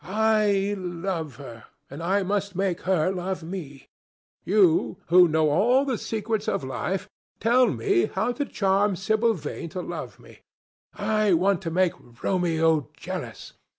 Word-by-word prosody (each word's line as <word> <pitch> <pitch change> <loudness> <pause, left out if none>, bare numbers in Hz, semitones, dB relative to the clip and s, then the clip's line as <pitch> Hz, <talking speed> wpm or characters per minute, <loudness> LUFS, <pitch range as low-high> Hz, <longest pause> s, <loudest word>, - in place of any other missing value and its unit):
I 210 -1 +2
love 175 -5 -4
her, 115 -5 -11 0.2
and 140 +4 -9
I 195 +4 +1
must 200 0 -2
make 190 -2 -1
her 185 -1 +2
love 185 -1 -4
me. 160 -6 -8 0.6
You, 190 -4 +3
who 180 +1 +7
know 155 -1 +2
all 245 - +3
the 260 -5 -2
secrets 220 -1 -3
of - - -1
life, 135 +9 -3 0.3
tell 245 +2 +4
me 115 - +1
how 215 +6 -1
to 280 +4 -2
charm 200 -3 +1
Sibyl 220 +4 +1
Vane 160 0 -6
to 180 +3 -5
love - - -7
me! - - -16 0.6
I 210 -1 +1
want 190 +2 +2
to 170 - -3
make 180 +1 +2 0.3
Romeo 165 -5 +1
jealous. - - -7
190 Hz, 150 wpm, -25 LUFS, 165-210 Hz, 0.6 s, who